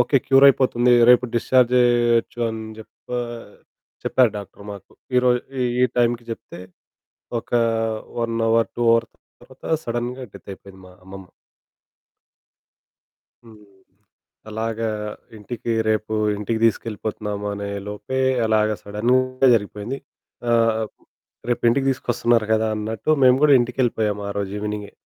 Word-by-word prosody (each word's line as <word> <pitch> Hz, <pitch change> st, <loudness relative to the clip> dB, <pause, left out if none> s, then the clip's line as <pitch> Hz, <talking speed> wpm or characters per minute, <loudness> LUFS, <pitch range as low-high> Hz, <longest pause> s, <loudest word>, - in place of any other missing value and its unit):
Okay 130 Hz, +3 st, +3 dB
cure 135 Hz, +1 st, +6 dB
అయిపోతుంది 125 Hz, -2 st, +3 dB, 0.2 s
రేపు 125 Hz, 0 st, +6 dB
discharge 125 Hz, +1 st, +3 dB
చేయొచ్చు 120 Hz, -1 st, +2 dB
అని 110 Hz, 0 st, -5 dB, 0.2 s
చెప్ప 110 Hz, -, -16 dB, 1.0 s
చెప్పారు 125 Hz, -3 st, +3 dB
డాక్టర్ 100 Hz, 0 st, -11 dB
మాకు. 100 Hz, -, -12 dB, 0.2 s
ఈ -, -, +7 dB
రోజు 125 Hz, -1 st, +3 dB, 0.4 s
ఈ -, -, +7 dB
టైంకి 120 Hz, 0 st, +1 dB
చెప్తే, 100 Hz, -5 st, -8 dB, 0.8 s
ఒక -, -, -19 dB, 0.7 s
1 115 Hz, 0 st, -2 dB
అవర్ 115 Hz, 0 st, +2 dB
2 -, -, -4 dB
అవర్ 115 Hz, 0 st, +1 dB, 0.3 s
తర్వాత 130 Hz, +2 st, -19 dB, 0.2 s
సడెన్‌గా 120 Hz, +2 st, -4 dB
డెత్ -, -, -13 dB
అయిపోయింది 95 Hz, 0 st, -13 dB
మా -, -, -15 dB
అమ్మమ్మ. 95 Hz, 0 st, -11 dB, 2.2 s
హ్మ్. 110 Hz, -2 st, -16 dB, 0.9 s
అలాగా 110 Hz, +1 st, -2 dB, 0.5 s
ఇంటికి 115 Hz, +2 st, -5 dB, 0.2 s
రేపు, 110 Hz, 0 st, 0 dB, 0.2 s
ఇంటికి 105 Hz, +2 st, -2 dB
తీసుకెళ్ళిపోతున్నాము 105 Hz, -2 st, -2 dB
అనే 100 Hz, 0 st, -5 dB, 0.2 s
లోపే 105 Hz, +6 st, -4 dB, 0.3 s
అలాగా 110 Hz, -1 st, +2 dB
సడెన్‌గా 130 Hz, +5 st, +1 dB
జరిగిపోయింది. 105 Hz, +4 st, -3 dB, 0.5 s
ఆహ్, 115 Hz, -1 st, +2 dB, 0.7 s
రేపు 120 Hz, -, -1 dB
ఇంటికి 135 Hz, +3 st, 0 dB
తీసుకొస్తున్నారు 120 Hz, -3 st, 0 dB
కదా! 110 Hz, 0 st, +1 dB
అన్నట్టు 110 Hz, +6 st, -3 dB
మేము 125 Hz, 0 st, +6 dB
కూడా 150 Hz, -1 st, +6 dB
ఇంటికి 120 Hz, +1 st, -4 dB
వెళ్ళిపోయాము 105 Hz, -4 st, -1 dB
ఆరోజు 100 Hz, -1 st, -3 dB
ఈవెనింగె. 105 Hz, -1 st, -5 dB
115 Hz, 120 wpm, -22 LUFS, 105-125 Hz, 2.2 s, ఈ